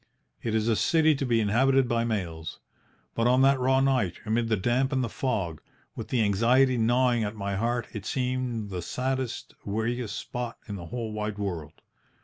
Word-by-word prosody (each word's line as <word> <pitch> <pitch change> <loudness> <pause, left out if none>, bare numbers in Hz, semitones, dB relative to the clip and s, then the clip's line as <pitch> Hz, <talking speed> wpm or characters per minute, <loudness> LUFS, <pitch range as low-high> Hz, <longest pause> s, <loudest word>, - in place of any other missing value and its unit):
It 110 -1 -1
is 110 0 +1
a 115 - +3
city 160 +5 +4
to 135 -2 -2
be 115 -2 +3
inhabited 130 +5 +3
by 115 -1 +1
males. 85 -8 -3 0.6
But 115 +1 +1
on 125 +2 +4
that 135 0 +4
raw 130 +1 +3
night, 130 -10 +2
amid 115 +2 +1
the 110 - +2
damp 125 +7 +1
and 130 -2 +1
the 115 - -2
fog, 95 - -2 0.3
with - - -6
the 120 -3 +1
anxiety 120 +6 +3
gnawing 120 0 +2
at 105 +1 -3
my 100 -1 -3
heart, 120 +3 0
it 105 -3 -6
seemed 125 -5 -2
the 90 -2 -3
saddest, 130 +3 -3
weariest 110 +2 -2
spot 120 -1 -5
in 105 - -5
the 85 -3 -7
whole 115 +2 -4
wide 105 -1 -3
world. 90 -7 -5
115 Hz, 185 wpm, -27 LUFS, 105-130 Hz, 0.6 s, city